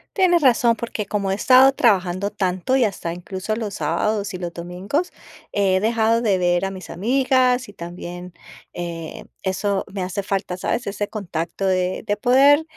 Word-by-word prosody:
Tienes 350 -4 +3
razón, 240 -2 +4
porque 225 -3 -5
como 200 -2 -1
he - - +2
estado 255 +5 +6
trabajando 195 -6 +2
tanto 185 +5 -1
y 265 - +4
hasta 190 -6 -2
incluso 190 +4 -4
los 215 -3 -4
sábados 210 -2 -1
y - - -4
los 175 -1 -5
domingos, 180 - -3 0.4
he 195 -2 +2
dejado 225 +2 +2
de 205 -5 +2
ver 175 0 +1
a 195 - -3
mis 190 -1 -9
amigas 255 +4 +2
y 205 - -13
también, 175 0 -8 0.4
eh, 170 -2 -6 0.2
eso 195 +1 -1
me 190 -1 -3
hace 185 +2 -3
falta, 195 -2 -2
¿sabes? 185 +6 -2
Ese 205 +1 -3
contacto 175 -3 -4
de 185 -1 0
de 205 -1 0
poder 275 +7 +5
200 Hz, 170 wpm, -21 LUFS, 180-235 Hz, 0.4 s, estado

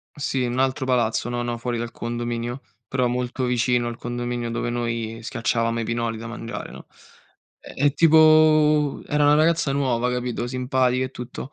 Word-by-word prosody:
Sì, 135 -3 -1
un 125 +1 -2
altro 130 0 0
palazzo, 120 -2 0
no 120 0 -2
no, 120 -1 -3
fuori 120 0 -3
dal 120 0 -4
condominio, 120 +1 -4 0.2
però 130 -2 0
molto 125 +1 -2
vicino 125 0 +1
al 120 - -4
condominio 120 -1 -4
dove 120 - -2
noi 115 -1 -3
schiacciavamo 115 -1 -1
i - - -1
pinoli 115 -1 -2
da 115 - -7
mangiare, 115 0 -6
no. - - -11 0.8
E. 145 +1 0
tipo, 155 -2 +5
era 150 0 +1
una 145 0 +5
ragazza 160 -2 +2
nuova, 125 -3 0
capito, 125 -1 -2
simpatica 125 0 0
e 130 - -9
tutto. 125 +2 -8
125 Hz, 165 wpm, -23 LUFS, 120-135 Hz, 0.8 s, tipo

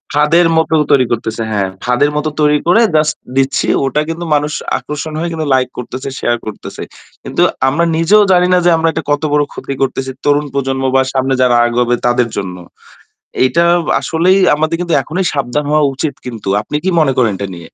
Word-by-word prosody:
ফাদের 165 +3 +4
মতো 160 0 +1 0.2
তৈরি 130 -3 +4
করতেছে। 115 0 -2
হ্যাঁ, 100 -2 0 0.2
ফাদের 125 +4 +2
মত 150 - -1 0.2
তৈরি 150 0 +3
করে 220 +7 +5
জাস্ট 155 0 +2 0.2
দিচ্ছি। 135 0 +1 0.2
ওটা 150 +3 0
কিন্তু 170 +1 -4
মানুষ 150 +1 -1 0.3
আকর্ষণ 150 +1 -6
হয়ে 170 +1 -2 0.3
লাইক 130 -1 0
করতেছে, 130 +2 -6
শেয়ার 120 - 0
করতেছে। 110 - -7 0.4
কিন্তু - - -2 0.3
আমরা 170 +5 +1
নিজেও 205 +6 +4
জানি 180 0 +4
না - - +5
যে - - +5
আমরা 165 0 +1
এটা 160 - -4
কত 145 +1 0
বড় 150 0 +3
ক্ষতি 140 - -6
করতেছি। 135 0 -1
তরুণ 145 +1 +2
প্রজন্ম 135 -1 -2
বা 135 - +5
সামনে 135 0 0
যারা 125 -1 +3
আগাবে 120 0 +1
তাদের 120 -1 +2
জন্য। 90 -2 -4 0.9
এইটা 130 +7 +2 0.2
বা - - -1
আসলেই 180 +4 +2 0.2
আমাদের 155 +2 0
কিন্তু 170 -2 -2
এখনই 180 +4 -3
সাবধান 140 +1 -2
হওয়া 155 0 +3
উচিত 140 +1 -3
কিন্তু। 115 -5 -6
আপনি 150 - -6
কি 190 - +1
মনে 145 -4 +3
করেন 115 -5 +2
এটা 100 - -3
নিয়ে? 85 - -9
145 Hz, 190 wpm, -14 LUFS, 125-160 Hz, 0.9 s, করে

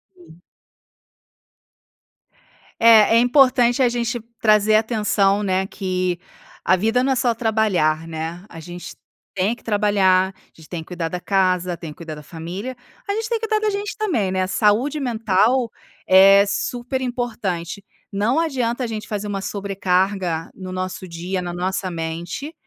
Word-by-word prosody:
Sim. 345 - -18 2.4
É 225 -1 +7
importante 245 0 +4
a 245 - +4
gente 240 0 -2 0.2
trazer 215 -1 +4
atenção, 210 -2 +2
né, 190 0 0
que 185 -3 -2 0.4
a 185 - +4
vida 225 +6 +1
não 270 - +1
é 265 - +2
só 240 -1 +1
trabalhar, 210 -9 +1
né? 165 +3 -6
A 165 - -10
gente 175 +2 -9 0.4
tem 200 +4 0
que - - -22
trabalhar, 195 -3 +2
a - - -28
gente 160 -2 -16
tem 170 -3 -4
que - - -14
cuidar 175 -2 -3
da 180 - -4
casa, 185 -2 +1
tem 165 -3 -8
que - - -14
cuidar 160 -2 -7
da 150 - -11
família, 175 +11 -6 0.3
a 400 - 0
gente 440 +2 -3
tem 460 -1 0
que 450 - -3
cuidar 430 0 0
da 425 - +2
gente 410 +1 -4
também, 240 - 0
né. 185 0 0
A - - -2
saúde 225 +9 +1
mental 230 0 +1 0.4
é 195 +1 +7
super 245 +5 -3
importante. 220 -8 -3 0.3
Não 215 +9 +1
adianta 255 -6 -1
a - - -1
gente 220 -2 -5
fazer 210 -1 -4
uma 195 -1 -3
sobrecarga 190 -4 -1
no 185 -1 -8
nosso 185 0 -5
dia, 180 +2 -4
na 175 -1 -5
nossa 185 +1 -2
mente, 170 - -5
200 Hz, 160 wpm, -21 LUFS, 180-240 Hz, 2.4 s, É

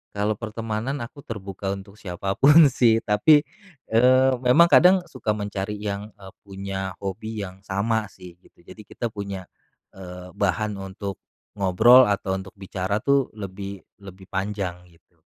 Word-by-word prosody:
Kalau 105 +1 0
pertemanan 115 +4 -4
aku 120 - -11
terbuka 100 -3 -5
untuk 100 +2 -13
siapa 95 -1 -4
pun 150 +2 +8
sih, 115 -3 +3
tapi, 145 +9 +4 0.5
eee, 130 +3 +5
memang 150 +8 +6
kadang 180 +2 +7
suka 110 -5 -3
mencari 100 0 -4
yang, 105 0 -5
eee, 95 -2 -13 0.2
punya 95 -1 -5
hobi 105 +2 -5
yang 95 0 -9
sama 110 +3 -1
sih 90 -3 -14
gitu, 85 - -25
jadi 110 - -13
kita 120 -2 -5
punya, 100 -2 -6 0.5
eee, 90 -1 -10
bahan 100 +2 -1
untuk, 95 0 -6 0.4
ngobrol 110 +7 +6
atau 100 -2 -1
untuk 95 0 -9
bicara 95 +1 -3
tuh 140 -2 +1
lebih 100 -1 -7 0.2
lebih 95 -1 -13
panjang 95 -2 -3 0.2
gitu. 85 0 -30
100 Hz, 145 wpm, -24 LUFS, 95-110 Hz, 0.5 s, pun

